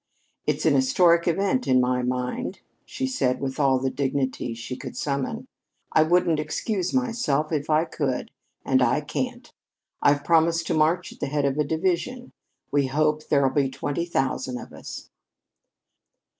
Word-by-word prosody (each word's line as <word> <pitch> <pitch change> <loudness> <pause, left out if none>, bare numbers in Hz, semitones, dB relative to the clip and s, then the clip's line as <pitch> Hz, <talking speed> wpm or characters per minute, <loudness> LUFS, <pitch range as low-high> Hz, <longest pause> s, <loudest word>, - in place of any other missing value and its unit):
"It's - - 0
an - - +5
historic 180 -11 +4
event 195 +8 +1
to 130 - +3
my 125 0 +2
mind," 125 0 -3 0.2
she 130 - -3
said 130 -1 0
with 135 +1 -4
all 135 -2 +4
the 130 +1 -1
dignity 130 -3 -2
she 120 +2 -6
could - - -8
summon. 140 -2 -2 0.5
"I 155 - +5
wouldn't 165 -1 +3
excuse 180 +5 -2
myself 230 - 0
if 150 -2 -2
I 155 +1 +3
could. 140 -6 -3 0.3
And 130 -1 +3
I 125 +4 +3
can't. 245 - -4 0.5
I've 145 0 +3
promised 165 0 +3
to - - -1
march 165 +4 +1
at - - -20
the - - -2
head 145 0 0
of 140 +1 0
a - - +4
division. 180 - -1 0.4
We 140 -2 +2
hope 155 +2 0
there'll 140 -2 +3
be 140 -2 +2
twenty 145 +5 -3
thousand 130 -4 -1
of - - -10
us." - - -9
150 Hz, 160 wpm, -25 LUFS, 130-170 Hz, 0.5 s, an